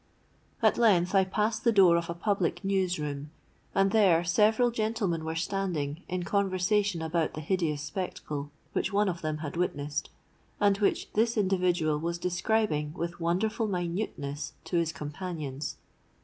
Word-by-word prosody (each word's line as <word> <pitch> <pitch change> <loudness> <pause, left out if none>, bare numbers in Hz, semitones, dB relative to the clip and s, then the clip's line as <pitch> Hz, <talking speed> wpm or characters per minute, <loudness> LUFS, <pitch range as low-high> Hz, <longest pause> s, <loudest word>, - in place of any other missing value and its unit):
At - - +4
length 190 -6 +4
I 195 -1 +5
passed 210 +4 -1
the 235 - +4
door 190 -5 +6
of 170 0 -1
a 170 - -3
public 195 0 -1
news 190 -2 +1
room; 145 -1 -4 0.5
and 195 0 +3
there 190 -6 +4
several 215 +7 +3
gentlemen 215 -7 -1
were 160 0 -3
standing, 165 -4 -2
in 180 -1 -2
conversation 195 -1 +1
about 160 0 -1
the - - -4
hideous 155 -3 -1
spectacle, 155 -3 -4 0.2
which - - 0
one 205 +1 +2
of 175 -2 -2
them 155 -1 -2
had 145 - -5
witnessed, 145 -4 -2 0.5
and 205 -1 +4
which 205 - 0
this 225 +2 +2
individual 180 -6 +2
was 170 +2 -2
describing 175 -4 0
with 170 -1 -4
wonderful 200 +7 0
minuteness 175 -6 -3
to 175 - -1
his 165 -1 +1
companions. 150 -2 -5
180 Hz, 150 wpm, -29 LUFS, 160-200 Hz, 0.5 s, door